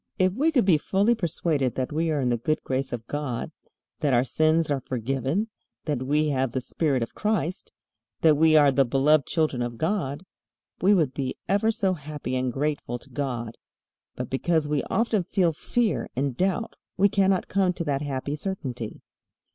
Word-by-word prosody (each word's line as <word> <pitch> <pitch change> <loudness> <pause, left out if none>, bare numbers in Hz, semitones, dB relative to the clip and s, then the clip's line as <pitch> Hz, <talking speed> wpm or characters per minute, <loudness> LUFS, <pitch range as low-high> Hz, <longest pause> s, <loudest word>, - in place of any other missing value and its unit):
If 185 0 +2
we 295 +9 +2
could 250 -9 +3
be 170 -6 +4
fully 200 +8 +2
persuaded 160 - 0
that 130 +1 -2
we 160 +2 0
are 155 -2 0
in 125 -2 +1
the 120 - +1
good 155 +6 -1
grace 130 +1 -2
of 115 -2 -5
God, 145 -3 -3 0.5
that 140 -4 +2
our 120 - +4
sins 155 +3 +2
are 140 - +1
forgiven, 135 - -2 0.4
that 145 -5 -1
we 150 +3 +1
have 130 -3 0
the 130 - 0
Spirit 135 -2 0
of 115 - -7
Christ, 205 -4 -2 0.5
that 155 -2 +6
we 160 +1 +4
are 145 -2 +6
the 135 +1 +4
beloved 135 +3 +3
children 155 -6 0
of 120 -1 -3
God, 160 - -2 0.6
we 200 +3 +5
would 155 -8 +1
be 130 -1 -3
ever 200 +4 +2
so 205 -4 +1
happy 145 -5 -5
and 130 0 0
grateful 140 -2 -2
to - - -15
God. 120 -5 -4 0.6
But - - -5
because 155 +3 +1
we 150 -2 0
often 225 -4 +1
feel 175 -1 +1
fear 230 +7 -1
and 135 0 -1
doubt 190 - -1 0.2
we 200 +2 +5
cannot 195 -2 +2
come 190 -2 +2
to 175 - -4
that 140 -3 -1
happy 140 0 -3
certainty. 135 - -5
150 Hz, 185 wpm, -26 LUFS, 130-185 Hz, 0.6 s, that